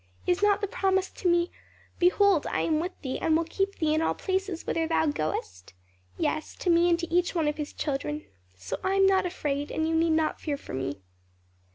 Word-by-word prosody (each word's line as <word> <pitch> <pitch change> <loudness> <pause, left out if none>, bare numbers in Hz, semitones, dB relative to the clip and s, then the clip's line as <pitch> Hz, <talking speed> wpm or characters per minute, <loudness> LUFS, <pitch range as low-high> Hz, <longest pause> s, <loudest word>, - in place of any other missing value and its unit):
Is 360 +2 +1
not 410 0 +3
the 410 - 0
promise 380 -1 0
to 360 - -1
me, 345 0 +2 0.5
'Behold, 360 -1 +4
I - - 0
am 310 -2 +1
with 360 +3 -4
thee, 260 -2 -3
and 315 -1 +3
will 335 - +1
keep 390 +4 -2
thee 310 -1 +1
in 310 - +2
all - - +1
places 380 -2 -2
whither 325 -1 0
thou 325 0 +2
goest?' 95 - -3 0.4
Yes; 310 - -2
to 360 - 0
me 340 +1 +4
and 340 - +4
to 340 -1 -5
each 355 +1 +2
one 320 -3 +1
of 295 - -1
His 300 -1 -4
children. 150 - -3 0.3
So 90 0 -5
I 380 +1 +1
am 390 0 +5
not 380 -1 +3
afraid, 290 -5 -3
and 315 0 -1
you 325 - 0
need 325 0 +3
not 315 -1 0
fear 295 -3 -2
for - - -10
me." 130 -5 -4
330 Hz, 220 wpm, -27 LUFS, 295-370 Hz, 0.5 s, am